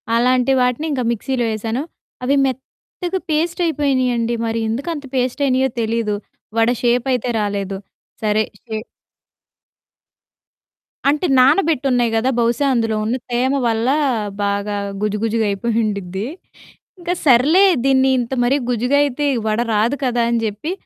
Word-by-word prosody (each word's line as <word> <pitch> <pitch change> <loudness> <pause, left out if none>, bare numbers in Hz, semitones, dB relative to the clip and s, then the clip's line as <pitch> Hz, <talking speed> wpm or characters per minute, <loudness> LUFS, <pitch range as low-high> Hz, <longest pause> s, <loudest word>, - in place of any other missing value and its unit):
అలాంటి 250 +2 +3
వాటిని 250 +4 0
ఇంక 270 -3 -1
మిక్సీలో 240 +2 -1
వేశాను. 225 +4 -2 0.4
అవి 270 +3 +2
మెత్తగా 305 +8 -5
పేస్ట్ 330 +4 0
అయిపోయినాయండి. 255 -7 0
మరి 225 0 -1
ఎందుకంత 285 +6 -3
పేస్ట్ 255 +2 -1
అయినాయో 260 0 +2
తెలీదు. 225 -1 -1 0.4
వడ 225 +1 +4
షేపైతే 245 0 +1
రాలేదు. 200 -1 -2 0.5
సరే 215 0 +2 0.2
షే 220 -2 -5 2.3
అంటే 300 +5 +2
నానబెట్టున్నాయి 270 -4 +3
గదా! 235 +4 +1
బహుశా 235 +4 +1
అందులో 225 -2 0
ఉన్న 230 +4 0 0.2
తేమ 250 +3 +1
వల్ల 225 0 0 0.6
బాగా 200 +1 -1 0.3
గుజు 210 0 0
గుజుగా 225 0 +1
అయిపోయుండిద్ది. 200 -2 -2 0.7
ఇంక 350 0 -2
సర్లే 290 +9 +6 0.2
దీన్ని 265 -1 +4
ఇంత 240 0 -3
మరి 255 +3 +3
గుజ్జుగా 250 +4 +1
అయితే 290 +1 -1 0.2
వడ 215 +1 +1
రాదు 225 +6 +2
కదా! 245 -2 +1
అని 235 -1 +1
జెప్పి 220 - -3
245 Hz, 125 wpm, -19 LUFS, 225-270 Hz, 2.3 s, సర్లే